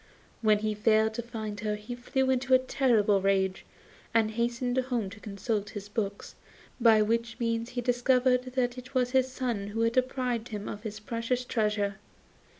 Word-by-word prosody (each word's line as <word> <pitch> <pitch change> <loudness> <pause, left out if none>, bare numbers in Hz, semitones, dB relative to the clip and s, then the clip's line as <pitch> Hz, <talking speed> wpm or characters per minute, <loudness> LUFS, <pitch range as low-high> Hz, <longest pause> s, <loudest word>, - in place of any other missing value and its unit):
When 215 -2 +4
he 215 0 -1
failed 220 +1 +3
to 235 - -3
find 220 -3 -6
her 210 0 -1
he 210 +3 -7
flew 260 +2 0
into 260 0 +3
a - - +8
terrible 235 -6 +2
rage, 190 -1 +1 0.5
and 220 -1 +3
hastened 240 +2 -1
home 245 -6 -2
to 220 - -11
consult 205 0 -3
his 205 -1 -8
books, 205 -2 -3 0.5
by 225 -3 +6
which 230 +1 -1
means 230 0 -1
he 245 0 -3
discovered 250 +1 +2
that 250 -1 0
it 255 +2 -13
was 250 -1 +2
his 260 0 +2
son 240 -6 -2
who 220 +2 -3
had 230 0 +2
deprived 250 -2 0
him 210 -3 -6
of 205 - -6
this 215 -1 -6
precious 230 +3 -2
treasure. 210 -4 0
230 Hz, 175 wpm, -29 LUFS, 210-250 Hz, 0.5 s, a